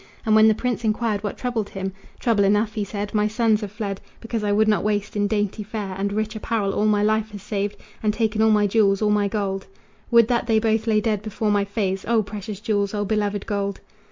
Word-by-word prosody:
And 220 - +3
when 215 0 +7
the 220 - +4
prince 245 0 -2
enquired 215 -1 0
what 205 - -3
troubled 235 -5 -2
him: 190 0 -4 0.3
"Trouble 225 -4 +2
enough," 210 +2 +2
he 210 - -2
said, 205 +1 -5
"my 210 -1 +2
sons 220 0 +2
have 205 -2 -5
fled 200 -2 -4 0.2
Because 230 -1 -4
I 205 - +1
would 215 +1 +3
not 210 -1 +2
waste 205 -1 -1
in 205 0 +1
dainty 205 0 -1
fare 205 -2 -5
And 200 +1 -2
rich 215 +1 -2
apparel 215 -2 -1
all 210 - +1
my 210 -1 +3
life 215 0 +1
has 205 -2 -8
saved, 205 0 -2 0.2
And 215 - +2
taken 220 0 0
all 220 - +5
my 210 -1 +4
jewels, 200 -1 +3
all 210 - +3
my 205 -1 +2
gold. 195 -2 -2 0.4
Would 235 -2 +6
that 240 -1 0
they 225 -2 +3
both 220 0 +1
lay 215 -1 +3
dead 215 -3 0
before 215 0 -2
my 205 -1 +2
face! 195 -2 -2
O 230 -1 +3
precious 205 0 -7
jewels! 205 -2 -1
O 205 0 -1
beloved 205 -1 -1
gold!" 200 -2 -2
210 Hz, 235 wpm, -23 LUFS, 205-220 Hz, 0.4 s, when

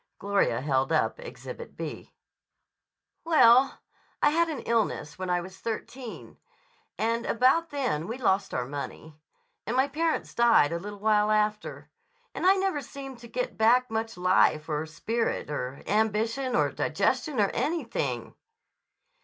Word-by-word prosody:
Gloria 200 -12 +1
held 135 -2 0
up - - +1
Exhibit 475 -1 -9
B. - - -6 1.1
"Well, 270 -5 +5 0.4
I 295 - +4
had 335 +2 +2
an 295 -6 -4
illness 220 -9 -1
when 185 -1 -3
I 175 0 +1
was 185 +1 -11
thirteen. 230 +2 -6 0.6
And 230 +1 0
about 265 +8 +3
then 250 - -2
we 230 +3 -4
lost 195 -6 +1
our 125 - -2
money. 145 +3 -7 0.5
And 235 +3 -1
my 265 +2 +4
parents 320 +3 -1
died 235 -11 +4
a 170 - -2
little 205 +3 -7
while 210 0 +2
after. 215 0 -1 0.4
And - - 0
I 385 - +7
never 380 -6 0
seemed 270 -1 -9
to 235 - -11
get 250 +1 -4
back 245 +3 +4
much 225 -3 -3
life 180 -4 +3
or 155 +1 -2
spirit 225 +3 -2
or 135 -1 -4
ambition 220 +5 0
or - - +2
digestion 295 -7 0
or 200 -2 +3
anything." 335 +1 -2
225 Hz, 145 wpm, -27 LUFS, 185-265 Hz, 1.1 s, I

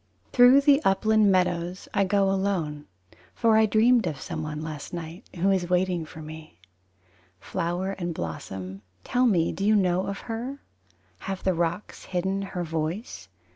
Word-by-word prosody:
II - - -42
Through 250 +2 +7
the 285 0 +5
upland 215 +1 +3
meadows 180 -1 0
I 200 - +2
go 195 0 +2
alone. 180 -7 -2 0.5
For 225 -1 +3
I 220 0 +5
dreamed 225 0 +4
of 150 -5 -4
someone 155 0 -5
last 155 0 -7
night 165 +1 -8
Who 185 +3 +2
is 180 -2 0
waiting 180 -2 +1
for 155 0 -10
me. 155 - -11 0.8
Flower 175 - -2
and 175 -3 -4
blossom, 95 - -6 0.2
tell 250 +1 +2
me 170 -7 +2
do 195 - -5
you 215 +2 +4
know 185 -2 +2
of 200 0 -4
her? 245 +4 -5 0.6
Have 195 -1 -5
the 190 - +2
rocks 170 +3 -3
hidden 190 +2 -1
her 185 -2 -4
voice? 165 +6 -4
185 Hz, 160 wpm, -26 LUFS, 165-205 Hz, 0.8 s, Through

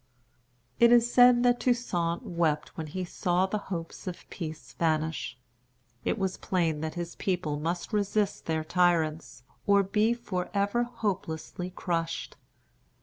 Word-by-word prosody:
It 235 0 +7
is 240 0 +5
said 245 -1 +7
that 245 0 +4
Toussaint 175 -9 0
wept 160 -3 -1
when 160 -1 -5
he 185 +4 -4
saw 180 +1 +1
the 210 +2 -2
hopes 170 0 -5
of 180 - -6
peace 155 -4 -7
vanish. 160 -5 -1 0.7
It - - 0
was 190 -1 -1
plain 165 -5 0
that 160 0 -3
his 175 -1 -5
people 170 -6 -1
must 170 +6 -3
resist 205 0 0
their 160 -1 0
tyrants, 160 -5 +1 0.2
or 200 0 +5
be 210 +4 +2
forever 200 +1 -1
hopelessly 185 -7 -3
crushed. 170 -2 -3
180 Hz, 135 wpm, -29 LUFS, 160-205 Hz, 0.7 s, It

